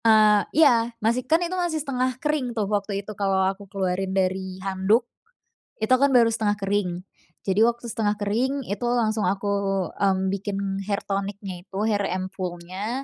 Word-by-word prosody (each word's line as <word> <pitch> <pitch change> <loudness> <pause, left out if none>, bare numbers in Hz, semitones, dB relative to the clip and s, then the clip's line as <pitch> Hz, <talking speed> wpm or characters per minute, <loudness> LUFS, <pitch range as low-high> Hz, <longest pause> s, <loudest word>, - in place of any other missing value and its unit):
Eee, 215 -2 +6 0.2
iya. 235 -4 +4
Masih, 230 +3 +1
kan 320 - +6
itu 345 - -4
masih 350 -3 0
setengah 255 -4 -1
kering 260 -5 -1
tuh, 210 - +1
waktu 200 -1 -2
itu 215 - -6
kalo 195 -1 +1
aku 200 0 -14
keluarin 190 -1 -1
dari 190 0 -1
handuk, 195 +5 +2 0.7
itu 220 +3 +1
kan 275 +2 +4
baru 240 -3 +5
setengah 210 -2 0
kering. 200 -1 0 0.6
Jadi 195 +1 +1
waktu 235 +1 +2
setengah 210 -1 0
kering, 245 +7 -1
itu 205 +4 -3
langsung 220 -4 +1
aku, 200 +1 -1 0.4
mmm, 190 -1 +1
bikin 200 0 -3 0.3
hair 200 -1 -1
tonic-nya 195 -2 -4
itu, 190 - -8
hair 210 -2 +1 0.2
ampoule-nya, 185 +5 -4
205 Hz, 160 wpm, -24 LUFS, 195-235 Hz, 0.7 s, Eee